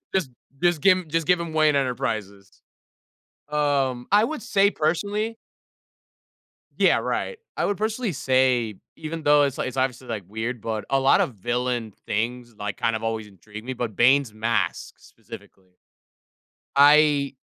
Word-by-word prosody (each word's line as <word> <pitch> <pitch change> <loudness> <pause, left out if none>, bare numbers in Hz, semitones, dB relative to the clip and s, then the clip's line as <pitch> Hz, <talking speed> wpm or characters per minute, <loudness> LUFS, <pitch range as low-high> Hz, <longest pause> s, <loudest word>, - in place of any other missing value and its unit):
Just 185 -8 0 0.3
just 175 -3 +2
give 185 0 +4
just 165 0 -1
give 180 0 +4
him 170 -1 -5
Wayne 155 -2 +3
Enterprises. 110 -7 -3 0.9
Um, 140 -4 0
I 210 +1 +5
would 310 +1 -3
say, 200 0 +3
personally 205 +8 -1 1.4
Yeah, - - +4
right. 475 - -3 0.2
I - - 0
would 205 - 0
personally 220 -1 -1
say, 130 -5 +1 0.2
even 160 0 -6
though 145 0 +5
it's 140 -2 -2
like - - -1
it's 130 - -8
obviously, 130 -1 -2
like, 105 -5 -4
weird, 110 +4 -4
but 110 -1 -4
a 135 - +2
lot 135 +1 +4
of 125 - -1
villain 120 +1 -2
things, 120 +2 -3
like, 105 -1 -5
kind 115 0 0
of 110 - -3
always 110 -1 -3
intrigued 105 +2 -12
me, 130 - -4
but 120 -4 -4
Bane's 125 -2 +3
mask, 110 -5 -1
specifically. 95 -1 -14 1.0
I 145 -1 +5
130 Hz, 150 wpm, -24 LUFS, 115-155 Hz, 1.4 s, I